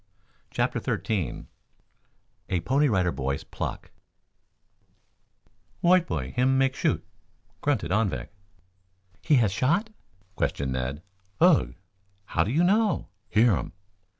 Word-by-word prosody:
CHAPTER - - -1
XIII 100 -8 -2 1.0
A 90 - +1
PONY 140 - +2
RIDER 90 -5 +2
BOY'S 70 0 -3
PLUCK - - -6 1.9
"White 180 0 +4
boy 65 -6 -3
him 130 +2 +2
make 135 0 +2
shoot," - - 0 0.6
grunted 110 - 0
Anvik. 95 - 0 0.9
"He 155 - +3
has 115 -6 +3
shot?" 170 - +1 0.4
questioned 70 -2 -1
Ned. 65 +5 -3 0.4
"Ugh." - - +4 0.5
"How 80 - +1
do 100 - -3
you 155 +8 +2
know?" 210 +4 +2 0.2
"Hear 110 -1 +4
um." - - -5
110 Hz, 110 wpm, -26 LUFS, -, 1.9 s, White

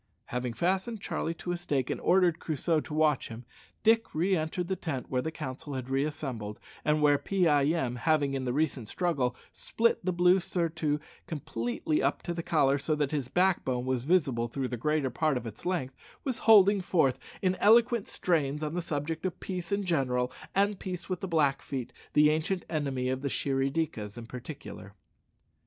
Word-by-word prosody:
Having 125 -1 -3
fastened 190 - 0
Charlie 165 -3 -3
to 175 - -5
a 175 - -1
stake, 145 -7 -1
and - - -3
ordered 175 -2 +3
Crusoe 160 +1 0
to 150 - -7
watch 155 -3 +2
him, 115 +2 -9 0.4
Dick 225 -2 +3
re 185 +5 +2
entered 165 +2 -2
the 190 - 0
tent 150 -8 -5
where 125 -1 +1
the 160 - -2
council 145 -2 -6
had 130 0 -5
reassembled, 135 -7 -2 0.2
and 150 0 +2
where 145 -1 +5
Pee 190 -3 +1
eye 145 -3 +4
em 140 -6 0
having, 145 0 +2
in 135 -1 -2
the 125 - -1
recent 135 -5 -1
struggle, 140 -9 0 0.2
split 230 -3 +1
the 185 - +1
blue 180 +2 +4
surtout 165 -4 -1 0.3
completely 135 0 -2
up 140 +1 0
to 175 - -3
the 170 - -3
collar, 140 -4 +2
so 150 +3 0
that 145 -2 0
his 145 -5 -1
backbone 145 -8 +1
was 130 -2 -1
visible 135 -8 +2
throughout 130 +2 -3
the - - -1
greater 145 +2 0
part 155 +2 +1
of 125 - -5
its 110 - -7
length 150 -8 -1 0.3
was 260 -4 -2
holding 200 -2 +7
forth 135 -8 +2 0.2
in 185 -1 +3
eloquent 230 0 +4
strains 150 -4 0
on 150 0 -2
the 180 - -1
subject 160 0 -3
of 185 -1 -3
peace 180 -2 -5
in 200 0 +1
general 130 -8 0 0.2
and 200 0 +2
peace 180 -1 -6
with 185 -1 -2
the 190 - -4
Blackfeet, 140 -5 0 0.2
the 150 0 +6
ancient 160 +4 -1
enemies 135 -5 -1
of 130 - -4
the 140 - -1
Shirry 135 0 0
dikas, 120 -9 -3
in 120 - -7
particular. 125 -4 -9
150 Hz, 190 wpm, -29 LUFS, 130-175 Hz, 0.4 s, holding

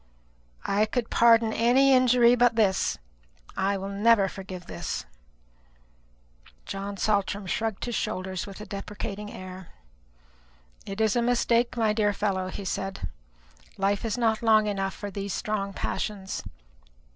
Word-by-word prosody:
"I 210 +2 +2
could 240 +1 -2
pardon 230 -1 +5
any 260 +4 +4
injury 250 -2 +5
but 245 -1 +4
this. 205 -4 +2 0.6
I 195 +1 +1
will 195 0 -5
never 205 0 +4
forgive 185 -2 -8
this." - - -5 1.6
John 200 +1 -5
Saltram 200 -1 0
shrugged 220 +2 -2
his 240 - -4
shoulders 185 -2 -3
with 195 0 -9
a 210 - -7
deprecating 210 +1 -6
air. 185 -1 -9 1.2
"It 195 +1 -5
is 220 0 +2
a 240 - +3
mistake, 240 0 +2
my 220 -2 +2
dear 210 -1 +2
fellow," 190 -3 -1
he 195 +1 -6
said. 190 - -3 0.7
"Life 195 +1 0
is 225 0 -1
not 225 -2 +1
long 220 -2 +5
enough 195 -2 -2
for 205 -1 -6
these 200 -1 -4
strong 200 -2 -2
passions. 195 0 -3
205 Hz, 135 wpm, -27 LUFS, 195-230 Hz, 1.6 s, pardon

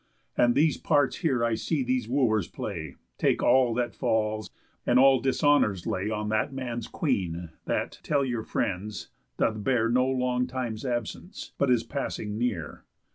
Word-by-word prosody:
And 120 0 +3
these 155 +2 +3
parts 145 -2 +2
here 130 -9 +1
I 115 - +1
see 135 +6 -1
these 125 -2 -1
Wooers 120 -5 +2
play, 80 -8 -6 0.2
Take - - +2
all 125 -2 +4
that 120 0 -1
falls, 110 -1 0 0.3
and 120 - +3
all 135 0 +6
dishonours 135 - +2
lay 95 +3 -1
On 105 -1 -2
that 110 +5 0
man's 120 -4 -4
Queen, 90 - -2
that, - - -2
tell 140 -2 +1
your 120 -3 -2
friends, 100 -1 -3 0.3
doth 110 -2 0
bear 120 -3 +2
No 125 +2 +3
long 125 -1 0
time's 125 -2 -4
absence, 120 - -4
but 140 - +2
is 120 -2 +3
passing 115 -4 -4
near. 115 -10 -3
120 Hz, 160 wpm, -27 LUFS, 110-130 Hz, 0.3 s, all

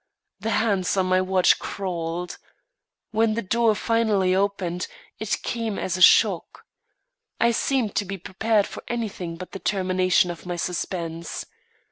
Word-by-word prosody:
The 225 - -3
hands 200 -4 +1
on 190 - +3
my 185 0 +3
watch 185 -1 +3
crawled. 175 -2 -4 0.7
When 220 0 +2
the 230 - -2
door 225 +2 +2
finally 215 -5 +2
opened, 190 -2 -1 0.3
it 220 -2 -2
came 230 -3 -2
as 180 - -2
a 185 - -4
shock. 185 -1 +4 0.7
I 235 +1 +4
seemed 235 -2 0
to 205 - +1
be 195 +1 -5
prepared 205 +3 +1
for - - -8
anything 205 -8 -4
but 185 - -8
the 195 - -7
termination 185 -2 +2
of 175 +1 -10
my 175 - -2
suspense. 170 -2 -4
190 Hz, 145 wpm, -24 LUFS, 180-220 Hz, 0.7 s, shock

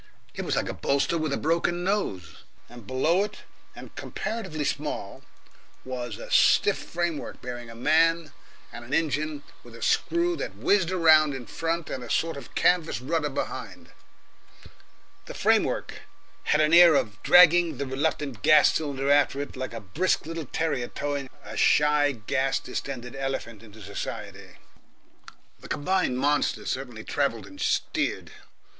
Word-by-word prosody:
It - - -5
was - - -1
like - - -1
a - - -3
bolster 140 +4 0
with 155 -3 -1
a - - 0
broken 170 +2 0
nose, 100 - -2 0.3
and 120 -4 -13
below 160 +9 +2
it, 210 0 -7 0.3
and - - -12
comparatively 195 -9 -4
small, 145 -8 -4 0.6
was 125 -4 -5
a - - -10
stiff - - +4
framework 170 -3 -4
bearing 120 -2 -7
a 115 - -10
man 160 +4 +2 0.4
and 120 - -8
an 125 +3 -2
engine 155 -1 -1 0.2
with 120 -1 -14
a 115 - -8
screw 345 +1 +1
that - - -5
whizzed 190 -4 +2
round 155 -5 +5
in 125 -2 -7
front 165 +6 -3
and 130 - -4
a 120 - -9
sort 165 0 0
of 140 - -11
canvas 175 -6 +2
rudder 150 +3 -1
behind. 135 - -6 1.4
The - - -8
framework - - +1 0.5
had 150 - +3
an 155 +1 +2
air 170 -2 +8
of 105 -5 -1
dragging 175 -3 +6
the 140 - -3
reluctant 135 -2 -2
gas 150 -1 +6
cylinder 140 -3 -1
after 145 -1 +3
it 145 - -5
like 130 0 -5
a 115 - -6
brisk 150 - -1
little 165 -1 -5
terrier 135 -6 -1
towing 140 -1 -4 0.2
a - - -8
shy 150 -1 +3
gas 130 +4 -1
distended 125 -2 -6
elephant 135 -5 -4
into 110 -1 -14
society. - - -7 1.1
The - - -12
combined 155 -3 0
monster 145 +2 0
certainly 125 -4 -4
travelled 115 -8 -1
and 95 0 -12
steered. - - -1
145 Hz, 150 wpm, -26 LUFS, 125-165 Hz, 1.4 s, air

